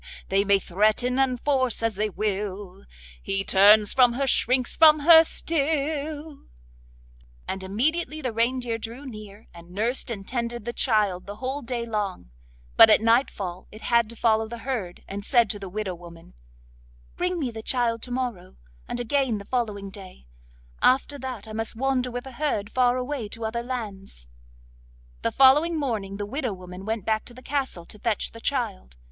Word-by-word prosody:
They 195 +1 +3
may 200 0 +4
threaten 215 +7 +1
and 255 -2 +1
force 260 -5 +1
as 225 -2 0
they 210 +2 0
will, 200 - -4 0.4
He 195 0 -1
turns 205 +2 +6
from 245 -2 +5
her, 275 +3 -1
shrinks 255 -1 +2
from 310 -2 +7
her 325 +1 +9
still,' 305 -1 -2 1.1
and 190 0 -4
immediately 305 - 0
the 255 -6 -3
reindeer 235 0 0
drew 235 +5 -8
near, 215 -4 -10
and 170 0 -13
nursed 225 +8 -1
and 200 -4 -6
tended 235 -2 -3
the 240 - -3
child 210 -8 +1
the 205 - -6
whole 260 +5 -3
day 240 -2 -3
long; 205 - -4 0.5
but - - +10
at - - +6
nightfall 215 -6 0
it 215 - -12
had 235 -2 +2
to 235 - -9
follow 220 -1 +2
the 235 +1 -7
herd, 220 -10 -4
and 200 +1 -6
said 235 -2 +3
to 205 - -5
the 195 -2 -7
widow 200 -1 -3
woman: 170 -1 -13 0.8
'Bring 360 0 -1
me 270 -7 -2
the 220 -1 -7
child 230 -1 0
to 250 - -8
morrow, 245 - -4 0.3
and 240 - -4
again 245 -1 0
the 200 - -9
following 210 -6 -2
day; 190 - -11 0.6
after 275 +2 +3
that 255 -5 -6
I 215 - -8
must 225 +1 -2
wander 255 +1 0
with 245 0 -5
the 265 - -9
herd 240 -6 -2
far 250 -1 +2
away 255 -3 -3
to 230 +1 -6
other 230 +2 -2
lands.' 205 - -6 0.9
The - - 0
following 300 +5 +5
morning 210 -8 -3
the 205 - -3
widow 250 0 -3
woman 185 0 -10
went 220 -2 -3
back 220 -1 0
to 240 - -12
the 255 - -13
castle 265 -12 -3
to 210 - -14
fetch 225 0 -1
the 230 - -12
child. 65 - -2
230 Hz, 175 wpm, -25 LUFS, 205-260 Hz, 1.1 s, but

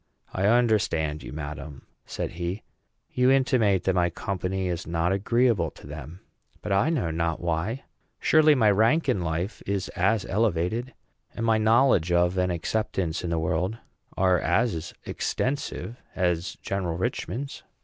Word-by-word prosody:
"I 95 +2 +1
understand 105 -10 +2
you, - - -8
madam," 75 -1 -7 0.2
said - - -4
he. 85 +4 -4 0.5
"You 125 0 +3
intimate 125 -8 +3
that 95 - +2
my 90 -1 +2
company 95 +2 -3
is 85 -2 -3
not 85 +1 0
agreeable 115 +2 +2
to - - -16
them; 75 +4 -9 0.4
but 105 - -4
I 100 +10 +3
know 125 - 0
not 80 0 -1
why. 85 +10 -2 0.4
Surely 155 -1 +5
my 110 -5 +4
rank 115 +10 +3
in 120 -8 +1
life 85 +5 -3
is 100 -1 -1
as 100 +3 +1
elevated, 110 +4 0 0.4
and 115 - -2
my 110 -1 +3
knowledge 110 - +4
of 90 +1 +3
and 90 0 +1
acceptance 90 -1 -2
in 85 - -2
the 85 - 0
world 90 +6 -1 0.4
are 95 -2 +3
as 85 0 0
extensive, 130 -3 -3 0.2
as 90 -1 0
General 90 -4 -2
Richman's." 125 +6 -3
95 Hz, 150 wpm, -26 LUFS, 85-115 Hz, 0.5 s, Surely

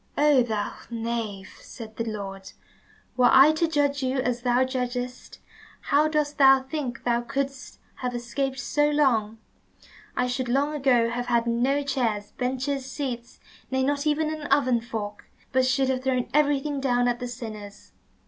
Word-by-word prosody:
"Oh, 290 -3 +5
thou 215 -4 -2 0.2
knave," 225 -4 -4
said 220 -3 -10
the 230 - -1
Lord, 195 -3 -6 0.6
"were 250 -1 +5
I 270 +3 +8
to 315 +2 +1
judge 285 -3 0
as 255 -2 -1
thou 245 +1 +3
judgest, 250 -1 -4 0.4
how 295 +2 +2
dost 300 -1 -1
thou 270 -1 +7
think 265 -3 -5
thou 240 -1 +1
couldst 275 +2 -4 0.2
have 250 -1 -3
escaped 265 +2 -3
so 295 +4 +1
long? 235 -8 +2 0.8
I 250 - +2
should 250 0 -2
long 280 +4 +1
ago 250 -5 +2
have 245 +1 -3
had 235 -1 +2
no 250 +5 +1
chairs, 225 -7 -1
benches, 265 +2 -2
seats, 245 -5 -5 0.3
nay, 265 0 0
not 285 +2 0
even 310 +1 +1
an 305 -2 -6
oven 255 -4 +3
fork, 215 -3 -6 0.2
but 260 0 +3
should 265 0 +2
have 260 -1 -1
thrown 255 -2 0
everything 290 -1 +2
down 245 -2 +2
at 240 0 0
the 250 - -4
sinners. 215 -4 -9
255 Hz, 160 wpm, -25 LUFS, 235-280 Hz, 0.8 s, I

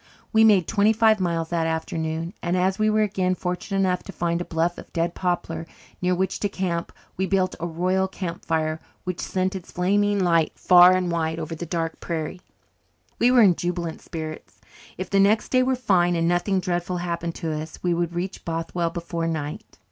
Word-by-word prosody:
We 220 0 +6
made 200 -6 +5
twenty 210 +2 +3
five 220 -1 +4
miles 165 -3 -1
that 165 -1 0
afternoon 160 +1 -3
and, 175 +1 0
as 190 +2 +1
we 215 0 +3
were 215 0 +3
again 185 -3 0
fortunate 180 +2 -3
enough 180 -1 +1
to - - -7
find 170 -1 -1
a - - -4
bluff 165 +1 -1
of - - -12
dead 170 +1 0
poplar 165 -2 -2 0.3
near 180 0 +2
which 190 +1 -1
to 205 - 0
camp, 175 -3 -2 0.3
we 190 +1 0
built 185 -1 +1
a 170 - -2
royal 185 +3 0
camp 180 -3 -6
fire 160 -1 -1 0.2
which 180 -2 -4
sent 185 +1 -1
its 185 -2 -8
flaming 205 +3 +2
light 170 -4 +2
far 180 0 +7
and 185 -1 0
wide 160 -1 -1
over 165 0 -4
the 165 +1 -6
dark 165 0 -2
prairie. 165 +1 -4 0.8
We 240 - +5
were 250 -2 +6
in 185 -4 +5
jubilant 175 -2 -3
spirits. 155 -1 -7 0.4
If 185 0 -5
the 200 - +3
next 205 +3 +3
day 255 - +4
were 260 +1 +2
fine 180 -8 +2
and 165 0 +1
nothing 175 +3 +1
dreadful 175 0 -2
happened 170 -1 -3
to 165 -3 -3
us, 155 +1 -6
we 175 -1 +2
would 170 0 -1
reach 180 +2 -4
Bothwell 165 +1 -2
before 170 0 -3
night. 155 -2 -5
175 Hz, 200 wpm, -24 LUFS, 165-190 Hz, 0.8 s, far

